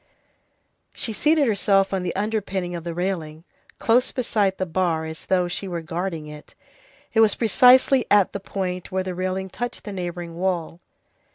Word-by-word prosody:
She 225 - -2
seated 300 +5 +3
herself 200 -2 +2
on 190 - 0
the 180 -1 -3
underpinning 195 -3 -2
of 170 -2 -5
the 170 -1 -5
railing, 165 -4 -3 0.3
close 240 +2 +2
beside 210 -6 0
the 185 - -1
bar, 165 -2 0
as 160 0 -8
though 180 -2 +2
she 185 +3 -3
were 170 -2 -4
guarding 165 -1 -4
it. 150 0 -12 0.6
It 225 - +2
was 220 -2 +5
precisely 250 +3 +5
at 205 -2 +4
the 200 - -3
point 185 -2 -4
where 190 0 0
the 185 -1 -4
railing 185 +1 -3
touched 245 +4 -5
the 205 - -6
neighboring 175 -2 -5
wall. 175 -3 -2
185 Hz, 170 wpm, -23 LUFS, 175-205 Hz, 0.6 s, was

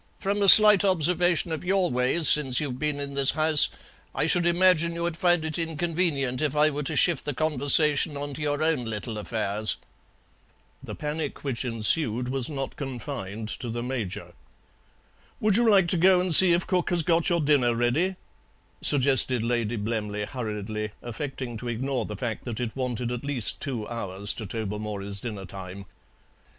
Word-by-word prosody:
"From 200 +1 -3
a 200 - +5
slight 210 -1 +9
observation 175 -2 +2
of 160 - -5
your 185 0 0
ways 125 +6 +2
since 135 -4 +5
you've 130 -4 -5
been 150 -1 -3
in 140 0 -6
this 140 0 +4
house 155 -1 +6 0.5
I - - 0
should 175 +1 +1
imagine 170 -1 +2
you'd 170 -1 -3
find 175 -2 +1
it 160 +1 -3
inconvenient 160 -5 -2
if 150 -1 -2
I 150 +1 +2
were 145 +1 -5
to 140 - -5
shift 170 -6 +1
the 145 -2 -5
conversation 150 0 +2
on 145 0 -6
to 150 - -9
your 145 0 -2
own 160 -6 -1
little 110 0 -6
affairs." 105 -1 -1 1.0
The - - -9
panic 150 0 -6
which 135 -4 -3
ensued 120 +1 0
was 130 0 -3
not 135 -3 -6
confined 120 -6 -7
to 125 - -4
the 120 +1 -5
Major. 120 -7 -6 1.1
"Would 215 -2 +1
you 235 -1 +2
like 195 -4 +3
to 180 - -1
go 185 +2 +3
and 180 -1 -1
see 180 +2 +7
if 175 - -1
cook 180 -2 -2
has 175 -3 -1
got 165 +3 0
your 170 -1 0
dinner 140 -6 +1
ready?" 140 +11 -1 0.7
suggested 130 -3 +5
Lady 120 -1 -2
Blemley 105 -1 -4
hurriedly, 105 -3 -6
affecting 125 -1 -7
to 120 - -8
ignore 130 +3 -4
the 105 - -8
fact 115 0 -6
that 120 -3 -6
it 120 -3 -5
wanted 125 -2 -4
at 125 +1 -6
least 140 -5 -2
two 120 -7 -5
hours 100 -3 -1
to 110 - -8
Tobermory's 105 -1 -6
dinner 105 -3 -8
time. 95 0 -10
135 Hz, 175 wpm, -24 LUFS, 115-165 Hz, 1.1 s, slight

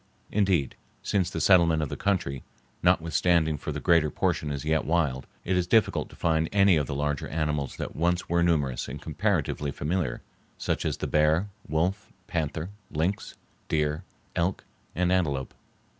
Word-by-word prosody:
Indeed, 95 -9 +2 0.3
since 95 -4 +1
the 85 - -4
settlement 85 -2 +5
of 75 - -3
the - - -4
country, 75 -10 -1 0.4
notwithstanding 80 0 +3
far - - -4
the - - -4
greater 85 -3 +4
portion 75 +1 -1
is 70 0 -4
yet 80 0 +2
wild, 75 -6 0 0.2
it 95 - +1
is 90 -1 +1
difficult 110 +2 +2
to - - -14
find 80 -1 +1
any 100 -2 +5
of 75 -4 0
the 70 - -3
larger 75 0 -1
animals 75 -3 -2
that - - -5
once 85 +2 0
were 85 0 +2
numerous 75 -7 +1
and 70 +3 -6
comparatively 80 -3 -1
familiar, 75 -3 -2 0.3
such - - -2
as - - -1
the - - -3
bear, 80 +6 +2 0.2
wolf, 95 +9 -1
panther, 80 +2 -3 0.2
lynx, 85 +6 -2 0.3
deer, 75 +2 0 0.3
elk, 90 +3 0 0.3
and 90 +2 +1
antelope. 70 -8 0
80 Hz, 160 wpm, -27 LUFS, 75-90 Hz, 0.4 s, settlement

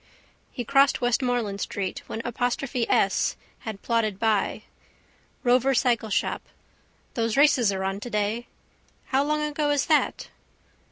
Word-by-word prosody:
He 245 - -5
crossed 275 +2 +4
Westmoreland 245 -4 0
street 190 -2 -3
when 225 - -5
apostrophe 245 +1 -1
S - - +2 0.2
had 215 -3 -7
plodded 225 -4 0
by. 215 -2 0 0.8
Rover 255 +2 +3
cycleshop. 230 -4 +1 0.7
Those 230 -1 -1
races 275 -7 +5
are 190 -1 -3
on 195 +1 -2
today. 215 +1 -2 0.6
How 270 +1 +3
long 300 +1 0
ago 300 0 -1
is 290 -2 +2
that? 310 -2 +1
240 Hz, 120 wpm, -25 LUFS, 215-270 Hz, 0.8 s, races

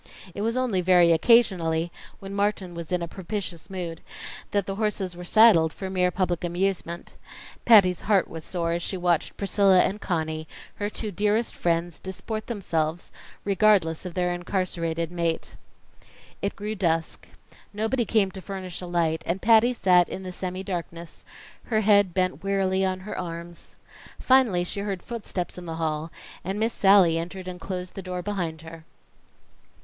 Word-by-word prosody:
It 200 - -5
was 230 +3 0
only 240 -8 +1
very 175 -1 +5
occasionally, 170 -5 +3 0.3
when 195 0 -8
Martin 200 -3 -1
was 170 -1 -7
in 180 -1 0
a - - -3
propitious 185 -1 -5
mood, 175 -4 -5 0.5
that 200 -2 0
the 195 - -3
horses 205 -4 -1
were 180 - -8
saddled 175 -5 +6
for 190 +2 -6
mere 180 -1 +2
public 180 -2 -1
amusement. 175 -1 -2 0.5
Patty's 195 -6 +6
heart 200 -3 +2
was 160 -1 -8
sore 170 -1 -2
as 170 - -1
she 190 - -3
watched 175 -2 0
Priscilla 200 -1 +3
and 200 +2 -1
Conny, 160 -3 -2 0.3
her 205 0 -2
two 215 0 -4
dearest 210 +4 0
friends, 170 -1 -1
disport 215 +3 -5
themselves 170 -7 -2 0.3
regardless 195 -5 +3
of 180 -2 -7
their 180 -1 +1
incarcerated 170 -2 -2
mate. 170 -2 -2 0.9
It 200 - -2
grew 210 +2 -4
dusk; 165 -5 -1 0.4
nobody 220 +4 0
came 210 -3 +2
to 190 - -9
furnish 185 -2 -6
a 180 - -6
light, 165 -2 0
and 175 +3 0
Patty 230 +3 +5
sat 180 -6 +4
in 190 - -6
the 185 - -5
semi 185 +1 -5
darkness, 170 -3 -6 0.4
her 220 -2 +1
head 205 -3 +4
bent 185 -1 0
wearily 195 -1 +1
on 185 -1 -1
her 210 - -6
arms. 170 -1 -7 0.4
Finally 250 -9 +3
she 180 - -4
heard 200 -3 -3
footsteps 200 -7 -5
in 175 - -10
the 165 - -4
hall, 160 -1 -2 0.3
and 190 +3 -3
Miss 225 +1 0
Sallie 190 -4 +5
entered 185 +2 -6
and 180 -1 -7
closed 180 -1 -5
the 195 - -6
door 180 -1 -5
behind 170 -6 -3
her. 160 0 -10
185 Hz, 165 wpm, -25 LUFS, 170-200 Hz, 0.9 s, saddled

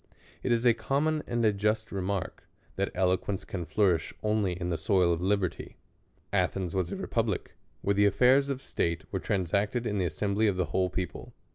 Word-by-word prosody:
It 125 - -1
is 120 +1 +2
a 120 - +7
common 145 +7 0
and 120 -1 0
a 105 - +4
just 105 +2 0
remark, 95 -1 -3 0.3
that 100 +1 -1
eloquence 95 +1 0
can 90 -3 -4
flourish 85 0 +1
only 105 -3 +1
in 90 0 -3
the 85 - 0
soil 90 0 +3
of 85 - -3
liberty. 95 -2 -1 0.6
Athens 90 -4 0
was 95 -3 -1
a - - -2
republic, - - -2 0.3
where 100 - +2
the 100 +1 +4
affairs 130 +7 +4
of 135 -1 -3
state 85 -7 -1
were - - -1
transacted 100 +5 0
in 105 -3 -1
the 90 - +1
assembly 100 +7 0
of 100 -3 +1
the 90 - +1
whole 95 -1 +2
people. 90 -1 -5
100 Hz, 185 wpm, -29 LUFS, 90-110 Hz, 0.6 s, a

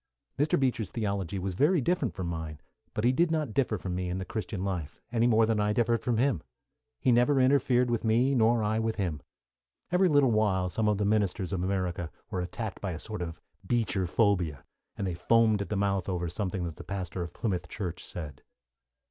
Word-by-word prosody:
Mr. 145 +1 +3
Beecher's 125 -6 0
theology 100 -4 -2
was 95 0 -2
very 155 - +3
different 145 - 0
from 95 - -3
mine, 80 -3 -4 0.4
but 110 - -1
he 120 - +5
did 170 +6 +2
not 155 -7 -1
differ 120 -4 +1
from 90 -1 -4
me 90 0 -2
in 90 - -2
the 95 - -4
Christian 105 -1 -4
life, 90 -7 -4
any 120 0 +3
more 115 -1 +5
than 110 -1 +1
I 105 0 +2
differed 115 +1 +2
from 120 -3 0
him. 125 - +2 0.6
He 130 - +3
never 125 +4 +4
interfered 130 -2 +3
with 120 -1 0
me, 120 +5 +3
nor 115 -2 +3
I 110 +1 +1
with 110 0 -1
him. 85 -8 -2 0.7
Every 180 +1 +4
little 145 -5 +4
while 100 -4 +2
some 110 +4 0
of 105 - +2
the 105 - 0
ministers 100 -2 0
of 90 - -1
America 90 -3 -1 0.2
were 90 - -1
attacked 105 +4 -5
by 95 -3 -2
a 80 - -6
sort 105 -1 -6
of 85 -2 -5 0.2
Beecher 100 -6 0
phobia, 90 - +1 0.3
and 100 - -2
they 90 - -1
foamed 110 +4 +3
at 100 - -4
the 105 - -1
mouth 100 -2 0
over 90 -2 -1
something 90 +1 -3
that 85 -3 -5
the - - -8
pastor 95 -2 -4
of 85 - -6
Plymouth 90 -6 -2
Church 90 -4 -4
said. 75 -6 -7
105 Hz, 210 wpm, -29 LUFS, 90-120 Hz, 0.7 s, he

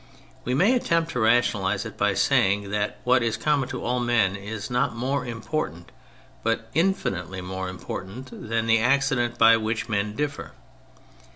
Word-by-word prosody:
We 125 - 0
may 200 - +4
attempt 170 -9 +1
to 125 - -2
rationalise 110 -4 +2
it - - -7
by - - +1
saying 100 +1 +2
that 105 0 -1
what 125 0 +4
is 115 -2 0
common 145 -4 +1
to - - -5
all 125 +1 0
men 120 -6 +2
is 105 +3 -6
not 125 -1 +1
more 130 +2 -2
important 115 - -4 0.5
but 115 0 -1
infinitely 95 - -1
more 95 0 -4
im 90 - -7
portant 100 +10 -7 0.2
than 115 0 0
the 115 0 +4
accidents 125 -1 +1
by 115 -1 +7
which 110 +1 -2
men 105 0 -1
differ. 150 +3 -4
115 Hz, 165 wpm, -25 LUFS, 105-130 Hz, 0.5 s, by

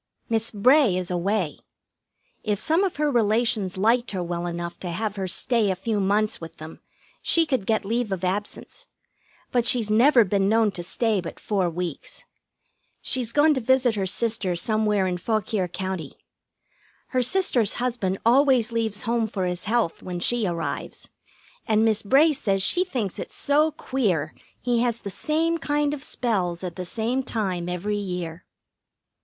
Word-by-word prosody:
Miss 225 0 +1
Bray 240 -1 +4
is 180 -1 -3
away. 180 -1 -1 0.8
If 210 -2 0
some 320 - +1
of 380 - -1
her 295 0 0
relations 220 -4 +1
liked 230 +5 +2
her 185 -2 -2
well 175 0 -3
enough 170 0 -5
to 180 - -5
have 210 +4 -3
her 190 -2 -3
stay 225 +3 +2
a 190 - 0
few 210 +3 -2
months 205 +2 +1
with 165 0 -9
them, 155 +1 -10 0.4
she 335 -1 +3
could 260 -10 -1
get 220 -2 +1
leave 230 +1 -1
of 190 -1 -3
absence; 205 - -4 0.6
but 240 -2 +1
she's 230 -4 +3
never 240 +3 +6
been 195 0 +1
known 220 -1 +3
to 180 - -5
stay 210 +3 0
but 170 - -8
four 195 -4 0
weeks. 170 -2 -5 0.8
She's 245 -3 +1
gone 300 +3 +4
to 260 - -2
visit 255 0 +3
her 195 -3 -1
sister 215 -3 0
somewhere 210 +1 +1
in 180 -1 -2
Fauquier 215 -2 -1
County. 185 -4 -5 1.0
Her 255 - +1
sister's 250 - +2
husband 235 -7 -1
always 250 -1 +4
leaves 220 -2 -2
home 230 -1 0
for 195 -4 -3
his 180 -1 -3
health 220 -5 0
when 180 -1 -5
she 230 +3 +1
arrives, 170 -2 -4 0.6
and 220 0 +3
Miss 220 -1 +2
Bray 285 +9 +4
says 195 -7 0
she 355 - +3
thinks 245 - -4
it's - - -7
so 300 +2 +2
queer 190 - -1 0.3
he 245 -1 0
has 235 -1 +1
the 200 -4 -7
same 325 - 0
kind 295 -1 0
of 290 -2 -6
spells 190 - -2
at 175 -2 -5
the 185 - -5
same 230 +7 -1
time 190 -8 -3
every 200 +4 -2
year. 180 -4 -5
215 Hz, 170 wpm, -24 LUFS, 185-245 Hz, 1.0 s, never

